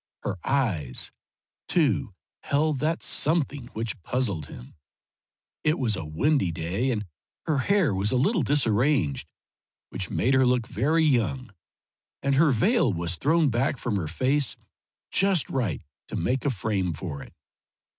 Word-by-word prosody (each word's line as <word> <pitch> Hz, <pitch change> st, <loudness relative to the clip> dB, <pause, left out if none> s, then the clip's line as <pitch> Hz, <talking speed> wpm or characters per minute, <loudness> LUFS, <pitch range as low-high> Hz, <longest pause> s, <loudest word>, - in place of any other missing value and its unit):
Her 95 Hz, -, -3 dB
eyes, 90 Hz, -, 0 dB, 0.6 s
too, 130 Hz, -, +1 dB, 0.3 s
held 150 Hz, 0 st, +1 dB
that 160 Hz, +4 st, -1 dB
something 145 Hz, -4 st, +1 dB
which 110 Hz, -3 st, -4 dB
puzzled 100 Hz, -, -1 dB
him. -, -, -11 dB, 0.9 s
It 155 Hz, +2 st, +2 dB
was 115 Hz, -5 st, +1 dB
a 95 Hz, -, -5 dB
windy 90 Hz, -, +1 dB
day, 85 Hz, +10 st, -2 dB
and 105 Hz, -4 st, -1 dB, 0.4 s
her 150 Hz, -3 st, +1 dB
hair 190 Hz, -, +2 dB
was 95 Hz, +2 st, 0 dB
a -, -, +1 dB
little 185 Hz, -, +2 dB
disarranged, 120 Hz, -, +1 dB, 0.6 s
which 95 Hz, -1 st, -4 dB
made 130 Hz, +4 st, +1 dB
her 130 Hz, -1 st, +4 dB
look 125 Hz, -2 st, +2 dB
very 160 Hz, +7 st, +1 dB
young, 130 Hz, -4 st, 0 dB, 0.7 s
and 140 Hz, -, +2 dB
her 150 Hz, +3 st, +5 dB
veil 165 Hz, -, +3 dB
was 85 Hz, -1 st, -1 dB
thrown 155 Hz, -, +2 dB
back 130 Hz, +4 st, 0 dB
from 115 Hz, -3 st, -2 dB
her 85 Hz, -5 st, -2 dB
face 130 Hz, -, 0 dB, 0.6 s
just 195 Hz, -5 st, +2 dB
right 110 Hz, -, -1 dB, 0.2 s
to -, -, -6 dB
make 130 Hz, 0 st, -1 dB
a -, -, +3 dB
frame 100 Hz, -6 st, -1 dB
for 75 Hz, -3 st, -6 dB
it. -, -, -13 dB
125 Hz, 145 wpm, -26 LUFS, 95-145 Hz, 0.9 s, her